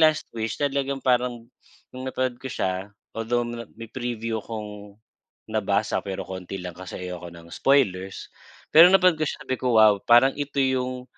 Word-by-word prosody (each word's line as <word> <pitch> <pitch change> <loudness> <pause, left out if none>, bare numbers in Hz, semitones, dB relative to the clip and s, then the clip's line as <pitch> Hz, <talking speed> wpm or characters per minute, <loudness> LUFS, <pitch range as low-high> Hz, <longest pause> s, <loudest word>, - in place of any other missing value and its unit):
"Last 155 -1 +4
Wish," 110 -2 -3
talagang 140 -1 -1
parang 125 -2 +1 0.5
nung 130 +1 -6
napanood 130 -2 -2
ko 130 - -6
siya 95 -2 -2 0.2
although 120 +2 -1 0.3
may 115 -1 -9
preview 115 -3 -3
kong 105 -2 -8 0.6
nabasa 105 -1 0
pero 95 -1 -5
konti 95 +1 -7
lang 90 -1 -6
kasi 90 +1 -9
ayoko 90 -1 -6
ng 85 0 -13
spoilers. 95 -9 +1 0.4
Pero 165 +3 +10
na 195 - +7
pagkasabi 155 -8 0
ko, 125 -3 +1
"Wow!" 105 -2 +6
parang 120 +5 +5
ito 145 0 -5
yung 130 -1 0
120 Hz, 150 wpm, -25 LUFS, 100-130 Hz, 0.6 s, Pero